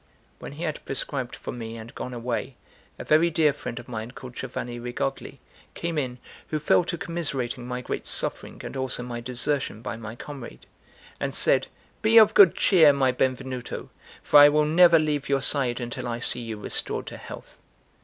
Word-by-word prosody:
When - - -8
he 155 +4 -7
had 155 -3 -3
prescribed 135 -2 -3
for - - -7
me 115 -2 -7
and 115 +1 -10
gone 125 - -6
away, 125 +2 -3 0.4
a - - -6
very 160 +3 +4
dear 155 -3 +3
friend 120 - -7
of - - -8
mine, 115 -2 -5
called 125 -1 -11
Giovanni 120 -2 -5
Rigogli, 125 +3 -4 0.4
came 170 -1 -3
in, 130 -4 -2 0.3
who 155 - -2
fell 150 +3 +3
to 175 -1 -3
commiserating 135 -8 -3
my 125 0 -4
great - - -4
suffering - - -2
and - - -7
also 130 -2 -2
my 120 -1 -5
desertion 125 -2 -2
by 115 - -4
my 110 0 -8
comrade, 135 -1 -9 0.5
and - - -3
said: - - +3 0.3
"Be 225 +1 +4
of 220 -2 +8
good 195 -5 +7
cheer, 165 -7 +6
my 135 -2 +2
Benvenuto, 130 0 -3 0.3
for 145 - +7
I 145 0 +10
will 150 +1 +3
never 170 +2 +6
leave 150 -3 -1
your 140 -1 +3
side 130 -4 0
until 120 +1 -5
I 115 -1 -2
see 120 0 0
you 115 -2 -5
restored 105 - -2
to - - -8
health." - - -11
130 Hz, 185 wpm, -25 LUFS, 120-150 Hz, 0.5 s, I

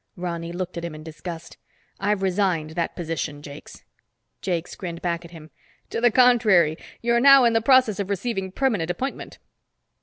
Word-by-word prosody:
Ronny 170 -1 -4
looked 180 0 -5
at 170 - -5
him 170 -2 -5
in 155 - -10
disgust. 160 +1 -9 0.4
"I've 200 0 0
resigned 185 -5 0
that 170 +1 -3
position, 160 -4 -4
Jakes." 145 +1 -11 0.6
Jakes 175 -3 -3
grinned 170 -3 -6
back 170 -1 -2
at 170 - -11
him. 160 -2 -13 0.4
"To - - -2
the 240 - +5
contrary, 220 -10 +4 0.3
you're 235 0 +3
now 275 +1 +7
in 235 - +3
the 225 - +2
process 250 -4 +4
of 200 -1 -3
receiving 195 -1 -3
permanent 210 -8 0
appointment." 255 +11 -5
180 Hz, 170 wpm, -23 LUFS, 165-225 Hz, 0.6 s, now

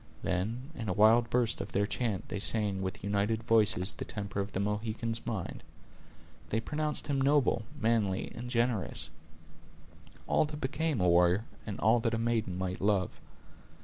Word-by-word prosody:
Then, 115 - -2
in 115 -8 -5
a - - +1
wild 115 +4 +5
burst 120 -2 +1
of - - -7
their 100 +1 +2
chant 110 -2 -2
they 100 - -3
sang 100 -2 +1
with 95 0 -4
united 105 +3 0
voices 105 -5 +3
the - - -6
temper 100 -1 -4
of 100 +1 -2
the - - -1
Mohican's 110 +3 -2
mind. 110 -6 -4 0.9
They 110 - +1
pronounced 150 +5 -2
him 140 -2 0
noble, 135 -5 +3
manly 110 -5 +1
and 120 +1 -6
generous; 120 -4 0 1.1
all - - +3
that 150 0 -7
became 145 - -1
a 90 - +3
warrior, 90 +4 +4 0.2
and 100 - -4
all 110 +3 +4
that 115 0 0
a - - 0
maid 115 -1 0
might 95 0 -3
love. 100 -2 0
110 Hz, 165 wpm, -31 LUFS, 100-120 Hz, 1.1 s, wild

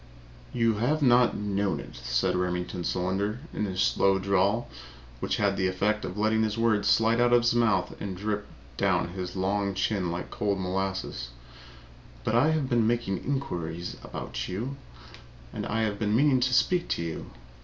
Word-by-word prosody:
"You 115 -3 +1
have 145 +7 +1
not 125 -1 +5
known 100 -1 -1
it," - - -10
said - - 0
Remington 90 0 -2
Solander 95 +5 -1 0.2
in 105 - -1
his 95 -1 -2
slow 95 0 +3
drawl, 100 +4 +1 0.5
which - - -1
had 100 -2 +1
the 95 - +2
effect 105 +4 0
of 90 - -6
letting 110 +1 +2
his 110 0 0
words 110 -3 +2
slide 115 +1 +4
out 120 0 +4
of 120 -1 +5
his 120 0 +3
mouth 110 -6 +2
and 95 -3 -4
drip 105 +1 -2 0.3
down - - +1
his 90 0 -6
long 100 +1 0
chin 95 -2 0
like 85 +1 -5
cold 100 -1 -1
molasses, 95 -9 -3 0.9
"but - - -1
I 125 +7 +4
have 155 -4 +1
been 120 -3 +2
making 115 -5 0
inquiries 90 - -3
about - - -5
you, 115 +9 -4 0.8
and - - -4
I 110 0 0
have 105 -2 -1
been 105 -1 +1
meaning 135 +1 +4
to 125 +1 +1
speak 170 +8 +2
to 85 - -1
you. 85 -1 -5
105 Hz, 175 wpm, -27 LUFS, 95-115 Hz, 0.9 s, not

